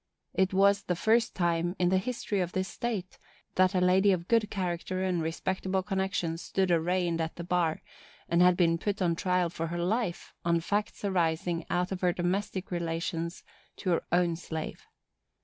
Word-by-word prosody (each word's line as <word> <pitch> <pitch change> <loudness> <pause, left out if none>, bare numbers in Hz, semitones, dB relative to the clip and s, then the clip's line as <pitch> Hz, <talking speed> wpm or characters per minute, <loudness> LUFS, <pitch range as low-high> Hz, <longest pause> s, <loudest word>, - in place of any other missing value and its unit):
It 190 0 +2
was 200 +1 +4
the 180 - -1
first 220 +5 +2
time, 175 0 0
in 180 -1 +2
the 190 0 +3
history 210 -1 -2
of 180 -1 -1
this 185 0 -1
state, 205 -6 -4 0.3
that 185 +1 +3
a - - +4
lady 185 +2 +4
of 175 -2 -1
good 225 -3 +3
character 185 -1 -2
and 180 -3 0
respectable 190 +3 -1
connections 185 -4 -1
stood 190 -2 0
arraigned 170 0 +1
at 160 0 -3
the 170 - -6
bar, 170 -2 0 0.4
and 170 +1 +3
had 180 0 +6
been 165 -2 +3
put 205 +2 -2
on 175 -3 +2
trial 180 -1 +1
for 165 -1 -3
her 170 +1 -4
life, 180 +1 -1
on 170 0 +2
facts 205 +4 -2
arising 170 -2 0
out 180 +1 0
of 190 - -3
her 180 -1 +3
domestic 190 +2 -2
relations 170 0 -3 0.3
to 185 - -1
her 170 - +1
own 175 -1 +3
slave. 160 -2 -6
180 Hz, 180 wpm, -29 LUFS, 170-190 Hz, 0.4 s, had